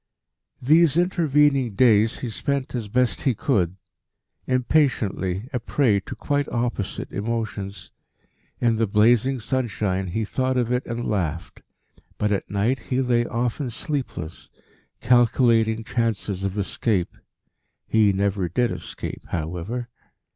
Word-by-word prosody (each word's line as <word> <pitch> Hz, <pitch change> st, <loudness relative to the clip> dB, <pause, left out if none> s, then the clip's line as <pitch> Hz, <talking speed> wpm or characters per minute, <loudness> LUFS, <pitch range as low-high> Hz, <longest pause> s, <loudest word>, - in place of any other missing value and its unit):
These 155 Hz, +3 st, +4 dB
intervening 150 Hz, -, +2 dB
days 110 Hz, -2 st, +4 dB
he 120 Hz, -, -3 dB
spent 140 Hz, +3 st, -2 dB
as 120 Hz, -4 st, -3 dB
best 125 Hz, 0 st, +1 dB
he 130 Hz, -4 st, +1 dB
could 95 Hz, -, 0 dB, 0.7 s
impatiently, 120 Hz, -, +1 dB
a 125 Hz, -, 0 dB
prey 115 Hz, -3 st, +2 dB
to -, -, -8 dB
quite 145 Hz, -1 st, -1 dB
opposite 120 Hz, -5 st, -3 dB
emotions. 105 Hz, -2 st, -4 dB, 0.7 s
In 115 Hz, -2 st, +2 dB
the 115 Hz, 0 st, +1 dB
blazing 120 Hz, +6 st, +3 dB
sunshine 105 Hz, -6 st, -1 dB
he 110 Hz, +5 st, -2 dB
thought 130 Hz, +4 st, -1 dB
of 120 Hz, -1 st, 0 dB
it 125 Hz, +1 st, +1 dB
and 120 Hz, 0 st, -3 dB
laughed; 85 Hz, -6 st, -3 dB, 0.6 s
but 105 Hz, 0 st, 0 dB
at 100 Hz, -, -1 dB
night 105 Hz, +7 st, 0 dB
he 130 Hz, -, +1 dB
lay 120 Hz, -2 st, +2 dB
often 120 Hz, +3 st, -2 dB
sleepless, 125 Hz, -, -5 dB, 0.5 s
calculating 115 Hz, -2 st, +3 dB
chances 110 Hz, -5 st, -2 dB
of 100 Hz, +1 st, -2 dB
escape. 100 Hz, -2 st, -1 dB, 0.7 s
He 110 Hz, -2 st, +3 dB
never 95 Hz, -2 st, 0 dB
did 120 Hz, +8 st, +1 dB
escape, -, -, -7 dB
however. 90 Hz, +9 st, -4 dB
115 Hz, 125 wpm, -24 LUFS, 100-130 Hz, 0.7 s, These